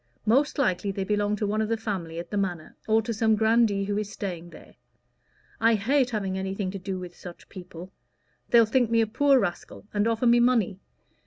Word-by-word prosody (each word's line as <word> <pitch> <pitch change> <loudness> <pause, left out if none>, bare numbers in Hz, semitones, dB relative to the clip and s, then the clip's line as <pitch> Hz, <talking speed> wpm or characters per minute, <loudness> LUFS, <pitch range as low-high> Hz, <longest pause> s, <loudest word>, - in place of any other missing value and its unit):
Most 265 +7 +2
likely 200 -7 0
they 195 0 -2
belong 205 +1 0
to 210 - -2
one 210 +2 0
of 215 - -2
the 230 - 0
family 190 -7 -5
at 170 0 -7
the - - -3
Manor, 180 -5 -3
or 220 0 +3
to 230 +1 -3
some 220 0 +2
grandee 220 -2 +2
who 205 +1 -1
is 210 -1 -5
staying 175 -5 -6
there. - - -15 0.9
I 230 0 +4
hate 250 +5 +1
having 195 -4 -2
anything 190 0 -3
to 195 - -6
do 190 0 -4
with 180 -1 -8
such 175 -1 -12
people. 180 -1 -10 0.6
They'll 235 -1 +6
think 240 +1 +1
me 230 0 +3
a - - +3
poor 270 +5 +3
rascal, 200 -4 -3
and 205 +1 +1
offer 230 +1 0
me 240 0 +5
money. 230 -6 +2
210 Hz, 210 wpm, -26 LUFS, 190-230 Hz, 0.9 s, They'll